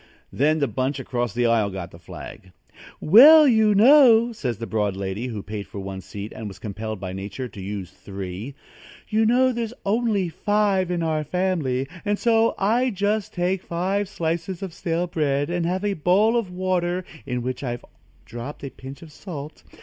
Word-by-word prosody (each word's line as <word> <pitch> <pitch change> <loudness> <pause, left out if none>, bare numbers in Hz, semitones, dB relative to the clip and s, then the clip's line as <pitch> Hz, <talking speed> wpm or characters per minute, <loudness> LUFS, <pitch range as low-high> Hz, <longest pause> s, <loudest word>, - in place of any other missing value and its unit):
Then 155 +4 +2
the 140 -2 +1
bunch 130 +2 -2
across 120 -3 -2
the 120 0 +1
aisle 115 -3 +2
got 95 -2 -7
the 85 - -14
flag. 90 +1 -11 0.5
"Well, 295 - +8
you 220 -4 +4
know," 240 0 +6
says 125 - -3
the 115 - -5
broad 105 -4 -1
lady 100 +5 -4
who 110 -5 -5
paid 105 -1 -6
for - - -10
one 95 -1 -6
seat 100 +3 -8
and 110 - -6
was 100 - -9
compelled 110 0 -6
by 95 -1 -5
Nature 100 +7 -5
to 100 - -10
use 95 -2 -6
three, 100 +7 -7 0.5
"you 220 +1 +2
know 255 +2 +4
there's 235 -1 -4
only 210 -2 +1
five 200 0 +1
in 175 -2 -1
our 155 -1 0
family, 150 -7 -1 0.2
and 205 0 0
so 225 0 +2
I 225 +6 +2
take 245 -5 -2
just 205 +1 -1 0.3
five 190 +4 -2
slices 170 0 -3
of 185 -4 -6
stale 170 0 -1
bread 145 -3 -1
and 175 -1 -1
have 185 +3 -1
a 205 - +1
bowl 195 +7 +3
of 230 -6 0
water 180 0 -1
ready 155 - -16
in 125 -1 -2
which 130 +2 -4
I've 120 -2 -4 0.4
dropped 120 +6 -8
a 140 - -5
pinch 135 +4 -10
of 160 - -13
salt. 150 -3 -8
160 Hz, 190 wpm, -23 LUFS, -, 0.5 s, Well